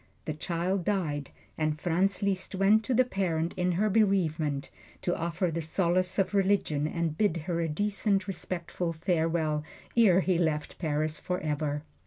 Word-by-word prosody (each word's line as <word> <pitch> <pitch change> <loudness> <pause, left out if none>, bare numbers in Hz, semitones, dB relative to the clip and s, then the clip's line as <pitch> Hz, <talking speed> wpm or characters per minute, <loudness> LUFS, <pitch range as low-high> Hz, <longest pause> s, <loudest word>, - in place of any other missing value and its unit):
The 155 - -2
child 175 +4 -1
died, 155 -8 -1 0.3
and 155 -1 0
Franz 185 +4 +1
Liszt 195 -1 -1
went 200 +3 +4
to 255 - +1
the 255 +2 +5
parent 175 -7 -1
in 180 -1 +1
her 205 +5 +2
bereavement, 170 -9 +1 0.3
to 175 - +1
offer 170 +1 -1
the 165 +1 -2
solace 180 +3 +1
of 195 +1 +1
religion 190 -7 +2
and 165 -1 -2
bid 195 -1 +1
her 170 -2 -1
a 165 - -1
decent, 200 +3 0
respectful 175 -2 -3
farewell, 160 -2 0 0.3
ere 195 -6 +6
he 185 -2 +1
left 155 -3 -1
Paris 155 -1 -1
forever. 150 -5 -2
175 Hz, 155 wpm, -29 LUFS, 155-195 Hz, 0.3 s, ere